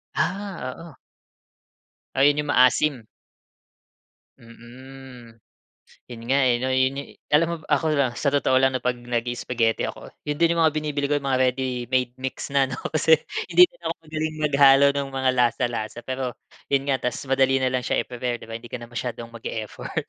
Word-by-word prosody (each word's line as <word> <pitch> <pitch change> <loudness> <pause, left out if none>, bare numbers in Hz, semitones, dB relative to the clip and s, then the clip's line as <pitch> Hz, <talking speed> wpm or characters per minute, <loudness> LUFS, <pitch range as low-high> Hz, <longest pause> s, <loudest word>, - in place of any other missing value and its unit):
Ah, 190 -9 -2
oo. 165 -3 -11 1.2
Ayun 145 +2 +4
yung 145 - -8
maasim? 125 -1 +3 1.3
Mm. 120 +1 -13 0.7
'Yun 120 -2 -9
nga 140 - +4
eh 120 - +3
'no, 130 +2 -2
yun 130 +1 +2
yu 140 - -5 0.2
alam 155 +3 +3
mo - - -1
ba 155 - -18
ako 155 +2 0
lang 135 -5 +1
sa 140 +2 0
totoo 140 -2 +2
lang 130 0 +4
'no, 130 - -2
'pag 125 0 -1
nagi-spaghetti 120 -1 -1
ako, - - -5 0.2
yun 150 +1 -3
din 170 0 +3
yung 165 - +2
mga 160 - +4
binibili 145 -2 -2
ko, 145 - +2
yung 140 - -6
mga 130 -1 +3
ready-made 125 -1 -2
mix 130 0 -5
na 140 -1 +2
ano, 130 - -4 0.2
kasi 160 0 +5 0.3
hindi 180 +1 +8
din - - -26
ako 165 0 -1
magaling 155 0 -3
maghalo 140 -2 +5
nung 140 -1 -2
mga 130 -1 0
lasa 125 +1 +2
lasa, 115 -1 -5
pero 130 0 -4 0.4
yun 140 0 +1
nga, 135 - +2
ta's 125 - -3
madali 135 0 +3
nalang 130 -1 0
siya - - 0
i-prepare, 125 -1 -3
'di - - -12
ba 115 - -6
hindi 115 0 -10
ka 125 - -4
na 120 - -10
masyadong 120 0 -5
mag-e-effort. 110 -2 -5
130 Hz, 180 wpm, -24 LUFS, 120-145 Hz, 1.3 s, hindi